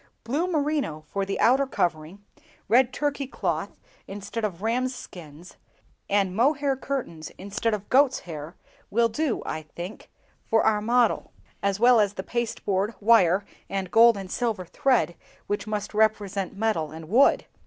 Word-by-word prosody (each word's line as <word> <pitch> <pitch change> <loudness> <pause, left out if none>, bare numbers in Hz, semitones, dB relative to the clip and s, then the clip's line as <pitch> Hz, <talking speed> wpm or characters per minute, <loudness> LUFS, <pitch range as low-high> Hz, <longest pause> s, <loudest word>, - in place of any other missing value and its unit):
Blue 290 +10 -1
merino 290 - -1
for 195 +5 -3
the 195 - -3
outer 270 +3 +4
covering, 175 -1 -2 0.4
red 240 +3 +4
Turkey 285 0 -2
cloth 180 - -3 0.3
instead 205 +3 -6
of 195 -2 -3
rams' 250 +3 0
skins, 170 -6 -12 0.5
and 195 -2 +1
mohair 275 +4 +2
curtains 255 - -5
instead 210 +3 -1
of 205 -1 -9
goats' 270 0 +3
hair, 160 0 -8 0.3
will 230 +2 +2
do, 275 +2 -1
I 155 - -3
think, 170 +6 -9 0.4
for 225 - +3
our 210 -1 +2
model; 235 +1 +1 0.3
as 200 0 0
well 240 0 +6
as 205 -1 +1
the 190 - -4
pasteboard, 215 -3 -2
wire, 200 -3 +4 0.2
and 190 -2 -3
gold 230 -1 +6
and 190 -1 -7
silver 220 -7 -1
thread, 245 0 +1 0.3
which 205 0 -3
must 210 -1 -3
represent 205 -3 0
metal 205 -8 0
and 160 0 -9
wood." 240 - +4
210 Hz, 150 wpm, -25 LUFS, 190-240 Hz, 0.5 s, well